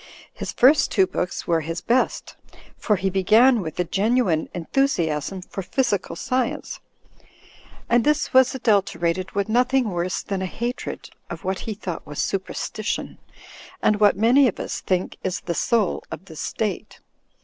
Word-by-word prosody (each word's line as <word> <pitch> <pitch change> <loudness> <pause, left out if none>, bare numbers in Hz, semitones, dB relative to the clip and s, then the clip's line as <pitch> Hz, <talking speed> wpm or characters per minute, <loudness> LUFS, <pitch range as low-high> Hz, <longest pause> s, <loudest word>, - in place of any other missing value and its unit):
His - - -5
first 275 +2 +5
two 190 -3 +3
books 180 -1 -3
were 165 -1 +1
his 165 +2 -4
best, 250 +2 0 0.4
for 210 - +1
he 190 0 -1
began 220 +6 +4
with 160 -2 -6
a - - +3
genuine 195 -2 +1
enthusiasm 175 - -1
for 195 - -6
physical 205 +1 -1
science, 255 -2 -2 1.1
and 240 0 +3
this 300 0 +1
was 260 0 +5
adulter 200 -8 +1
ated 185 +2 -2
with 200 +1 0
nothing 245 0 +2
worse 175 +1 -2
than 195 -2 -3
a 190 - -1
hatred 240 +6 -5 0.2
of - - -7
what 190 0 -2
he 215 - -3
thought 185 -5 -6
was 145 0 -8
superstition, 195 +3 -3 0.6
and 210 -1 +2
what 205 -2 +4
many 250 +6 +5
of 215 - -3
us - - -4
think 185 -1 -1
is 185 - -2
the 170 - -3
soul 210 +5 +1
of - - -8
the 165 -4 -12
state. 210 +6 -4
200 Hz, 160 wpm, -23 LUFS, 180-240 Hz, 1.1 s, first